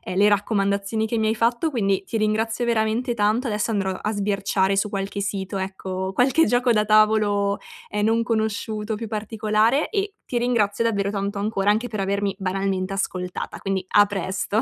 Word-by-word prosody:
le 205 Hz, +2 st, +5 dB
raccomandazioni 200 Hz, +1 st, 0 dB
che 230 Hz, +1 st, -2 dB
mi 220 Hz, -1 st, +1 dB
hai 220 Hz, -, +1 dB
fatto, 235 Hz, +7 st, +1 dB
quindi 200 Hz, -8 st, 0 dB
ti 225 Hz, -, -3 dB
ringrazio 225 Hz, +2 st, 0 dB
veramente 230 Hz, +2 st, 0 dB
tanto. 220 Hz, +3 st, +1 dB
Adesso 210 Hz, +1 st, -1 dB
andrò 195 Hz, -2 st, 0 dB
a 200 Hz, +3 st, -3 dB
sbirciare 200 Hz, -1 st, 0 dB
su 200 Hz, +2 st, 0 dB
qualche 195 Hz, 0 st, -3 dB
sito, 195 Hz, 0 st, -3 dB
ecco, 190 Hz, 0 st, -4 dB
qualche 270 Hz, +9 st, +3 dB
gioco 245 Hz, 0 st, +2 dB
da 210 Hz, -1 st, +3 dB
tavolo, 210 Hz, -1 st, +3 dB, 0.3 s
ehm, 210 Hz, 0 st, 0 dB
non 230 Hz, +1 st, +2 dB
conosciuto, 220 Hz, -1 st, -2 dB
più 225 Hz, +2 st, -5 dB
particolare, 215 Hz, +4 st, +1 dB
e 405 Hz, -1 st, -2 dB
ti 245 Hz, -, -2 dB
ringrazio 230 Hz, -3 st, +1 dB
davvero 200 Hz, -3 st, 0 dB
tanto 200 Hz, 0 st, -3 dB
ancora, 205 Hz, -1 st, 0 dB
anche 220 Hz, +4 st, +2 dB
per 215 Hz, -3 st, -5 dB
avermi 200 Hz, 0 st, -1 dB
banalmente 195 Hz, 0 st, -1 dB
ascoltata. 180 Hz, -2 st, -4 dB
Quindi, 190 Hz, -1 st, -2 dB
a 205 Hz, 0 st, +6 dB
presto. 200 Hz, +1 st, -1 dB
210 Hz, 170 wpm, -23 LUFS, 195-225 Hz, 0.3 s, a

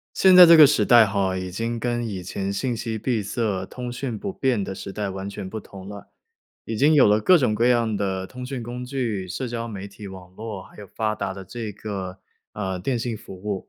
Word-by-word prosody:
现 190 Hz, -1 st, +6 dB
在 180 Hz, -, +12 dB
这 165 Hz, -1 st, +8 dB
个 150 Hz, -, +11 dB
时 145 Hz, -, +2 dB
代 120 Hz, -3 st, +7 dB
哈， 100 Hz, -2 st, 0 dB
已 95 Hz, 0 st, -5 dB
经 115 Hz, +5 st, -3 dB
跟 120 Hz, 0 st, -1 dB
以 100 Hz, -4 st, -5 dB
前 95 Hz, +2 st, -4 dB
信 120 Hz, +4 st, -2 dB
息 115 Hz, -1 st, -4 dB
闭 115 Hz, -1 st, -1 dB
塞、 100 Hz, -2 st, -2 dB
通 125 Hz, +4 st, -7 dB
讯 125 Hz, -2 st, -4 dB
不 195 Hz, -, -4 dB
便 130 Hz, -, 0 dB
的 95 Hz, -, -5 dB
时 95 Hz, -, -7 dB
代 105 Hz, 0 st, -3 dB
完 95 Hz, +1 st, -5 dB
全 100 Hz, -1 st, -6 dB
不 110 Hz, -, -5 dB
同 95 Hz, -2 st, -11 dB
了， 100 Hz, -1 st, -10 dB, 0.6 s
已 110 Hz, -, -3 dB
经 145 Hz, +7 st, +4 dB
有 145 Hz, -8 st, +6 dB
了 105 Hz, +1 st, +4 dB
各 175 Hz, -, +5 dB
种 125 Hz, -7 st, +1 dB
各 115 Hz, +3 st, +2 dB
样 115 Hz, -3 st, +2 dB
的 95 Hz, -2 st, -2 dB
通 125 Hz, +3 st, -9 dB
讯 130 Hz, -1 st, -5 dB
工 120 Hz, +2 st, -6 dB
具、 120 Hz, -8 st, -3 dB
社 125 Hz, +8 st, -4 dB
交 115 Hz, 0 st, -4 dB
媒 100 Hz, -3 st, -7 dB
体 100 Hz, +1 st, -11 dB
网 95 Hz, -1 st, -11 dB
络， 110 Hz, -3 st, -7 dB
还 -, -, -17 dB
有 105 Hz, -, -10 dB
发 110 Hz, +2 st, -2 dB
达 100 Hz, -2 st, -3 dB
的 95 Hz, 0 st, -8 dB
这 110 Hz, +2 st, -6 dB
个， 95 Hz, -2 st, -6 dB, 0.3 s
呃， 95 Hz, -3 st, -3 dB
电 120 Hz, +7 st, -1 dB
信 115 Hz, -1 st, -3 dB
服 95 Hz, -, -11 dB
务。 100 Hz, +1 st, -5 dB
110 Hz, 260 characters per minute, -23 LUFS, 95-120 Hz, 0.6 s, 在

